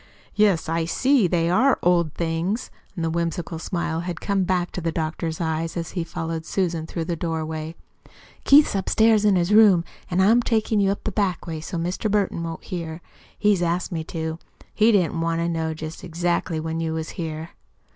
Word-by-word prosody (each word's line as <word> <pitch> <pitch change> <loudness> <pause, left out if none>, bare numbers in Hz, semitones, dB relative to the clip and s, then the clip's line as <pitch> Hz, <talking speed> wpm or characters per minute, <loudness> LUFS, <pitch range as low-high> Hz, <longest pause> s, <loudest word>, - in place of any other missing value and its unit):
"Yes, 205 -6 +3
I 165 0 0
see 255 +4 +3
they 170 -1 +1
are 240 +11 +4
old 170 -3 +2
things." 170 +7 -2 0.3
The 165 -1 -1
whimsical 170 0 -2
smile 170 -2 -2
had 175 +1 -4
come 195 -2 0
back 180 -1 0
to 180 - -5
the 165 0 -1
doctor's 160 0 -3
eyes 165 0 -2
as 165 0 -4
he 175 - -2
followed 165 0 -4
Susan 170 -3 -1
through 165 -1 -4
the 170 0 -2
doorway. 160 -1 -4 0.7
"Keith's 290 +2 +6
upstairs 215 +2 +3
in 205 -2 +5
his 175 +3 +1
room, 205 -6 +7 0.3
an' 180 - 0
I'm 220 +6 +5
takin' 220 -2 +1
you 195 -1 +3
up 200 - -2
the 215 - -2
back 190 -3 -1
way 160 -2 -5
so's 165 +1 -4
Mr. 180 +5 -2
Burton 200 -4 0
won't 165 -1 -5
hear. 165 -2 -5 0.4
He 205 -4 +2
asked 175 +1 -1
me 165 -2 -2
to. 160 -1 -4 0.3
He 220 +2 +4
didn't 175 -5 +2
want 165 0 0
to 170 - 0
know 160 -1 -2
jest 155 +3 -7
exactly 175 -1 -1
when 160 +1 -3
you 160 -1 -2
was 160 0 -4
here." 160 -2 -5
170 Hz, 190 wpm, -23 LUFS, 165-190 Hz, 0.7 s, room